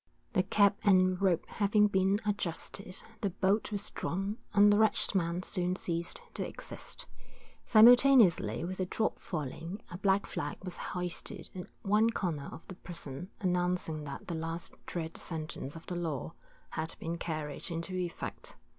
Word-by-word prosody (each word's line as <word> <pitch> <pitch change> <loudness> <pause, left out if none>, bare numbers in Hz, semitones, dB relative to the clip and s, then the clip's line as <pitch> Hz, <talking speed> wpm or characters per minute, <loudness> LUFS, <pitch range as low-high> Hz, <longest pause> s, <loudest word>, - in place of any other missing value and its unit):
The - - +4
cap 200 +1 +4
and 185 -2 +4
rope 180 -4 +2
having 210 0 +3
been 195 0 +2
adjusted, 195 -2 -2 0.2
the 200 - +1
bolt 195 +4 +1
was 205 -1 -2
drawn, 195 +5 -3
and 205 0 +6
the 205 - +4
wretched 220 -1 +3
man 175 -1 0
soon 180 -2 0
ceased 170 -2 -2
to - - -1
exist. - - -6 0.6
Simultaneously 225 - +6
with 185 +2 -5
the 185 - 0
drop 220 +4 -1
falling, 165 +4 -5
a 175 - -6
black 195 0 +3
flag - - -4
was 180 -2 -5 0.2
hoisted 180 -1 -3
at 180 -1 -7 0.2
one 215 +2 +4
corner 165 -10 -2
of 165 - -11
the - - -7
prison, 170 -3 -8
announcing 180 -4 0
that 140 - -7
the 175 - -3
last 165 +1 -4
dread 165 -2 -4
sentence 155 -3 -4
of 165 - -10
the 180 - -4
law 165 -3 -3 0.4
had 160 +1 -3
been 165 +1 -4
carried 155 -3 -3
into 170 +2 -4
effect. 180 -2 -4
180 Hz, 155 wpm, -32 LUFS, 165-200 Hz, 0.6 s, and